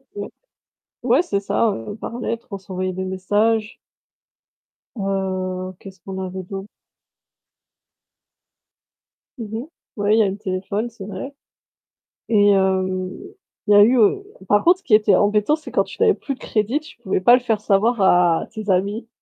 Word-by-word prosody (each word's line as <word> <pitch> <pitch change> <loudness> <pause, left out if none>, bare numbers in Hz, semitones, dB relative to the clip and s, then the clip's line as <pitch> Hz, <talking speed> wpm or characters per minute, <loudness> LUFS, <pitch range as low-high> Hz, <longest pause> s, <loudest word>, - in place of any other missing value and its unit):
Ouais. 205 0 -5 0.7
Ouais, 255 +6 +4
c'est 200 - -1
ça, 215 +3 +1
heu, 115 - -6
par 235 - -6
lettre, 230 -1 -4
on 200 - -4
s'envoyait 185 -1 -4
des 190 +1 -4
messages. 210 +4 0 1.2
Heu, 185 -2 -3
qu'est-ce 190 -2 -12
qu'on 190 +1 -6
avait 185 0 -5
d'aut 195 +1 -7 2.7
Mmh 220 -2 -5
mh. - - -8 0.3
Ouais 205 0 +2
il - - +3
y - - +6
a 200 - +1
eu - - -1
le 195 - -6
téléphone, 200 +3 -3
c'est 220 -4 -10
vrai. 265 +7 -7 1.0
Et 205 -2 +4
hem, 190 -1 +1 0.6
il - - +2
y - - +7
a 205 - +9
eu, 245 +4 +4
heu 230 - +3 0.2
par 205 +1 +3
contre, 355 +2 +4
ce - - -30
qui 225 - -1
était 210 -2 +4
embêtant, 210 +8 +2
c'est 315 - -11
quand - - +2
tu - - -11
n'avais 440 -2 +5
plus 280 - -5
de - - -27
crédit, 225 +6 -1
tu 310 +2 -15
pouvais 190 - -1
pas 240 +6 +7
le 250 - 0
faire 220 -4 -1
savoir 215 +2 +2
à 175 -3 +3
tes 215 -2 -7
amis. 200 +5 0
205 Hz, 175 wpm, -21 LUFS, 190-225 Hz, 2.7 s, a